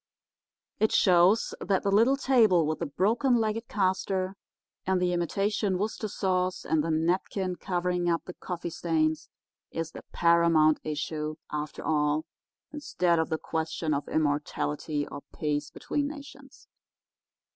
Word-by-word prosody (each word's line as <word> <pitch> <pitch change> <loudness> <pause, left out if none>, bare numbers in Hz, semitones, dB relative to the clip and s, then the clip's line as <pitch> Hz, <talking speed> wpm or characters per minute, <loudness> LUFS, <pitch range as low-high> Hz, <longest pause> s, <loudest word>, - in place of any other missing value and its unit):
It 220 - +3
shows 185 +4 +4
that 195 -2 0
the 200 - +1
little 230 +7 +4
table 225 - +4
with 155 +1 -2
the 170 - -2
broken 225 - +2
legged 225 0 -1
caster 190 -1 0 0.5
and 190 0 +1
the 180 0 +1
imitation 195 +3 0
Worcester 215 +2 -2
sauce 185 -2 -1
and 160 -2 +1
the 165 - -2
napkin 180 +3 0
covering 180 -1 -1
up 165 -1 0
the 180 - -7
coffee 175 -2 -5
stains 160 -1 0 0.4
is 165 0 -4
the - - -9
paramount 170 -2 +4
issue, 155 0 -3 0.2
after 150 0 -4
all, 150 0 +1 0.5
instead 180 - 0
of 160 - 0
the 160 - 0
question 160 0 -2
of 140 0 -2
immortality 150 0 -1
or 145 - -8
peace 150 -1 -2
between 285 -1 -2
nations. 280 -2 -11
175 Hz, 135 wpm, -28 LUFS, 155-200 Hz, 0.5 s, shows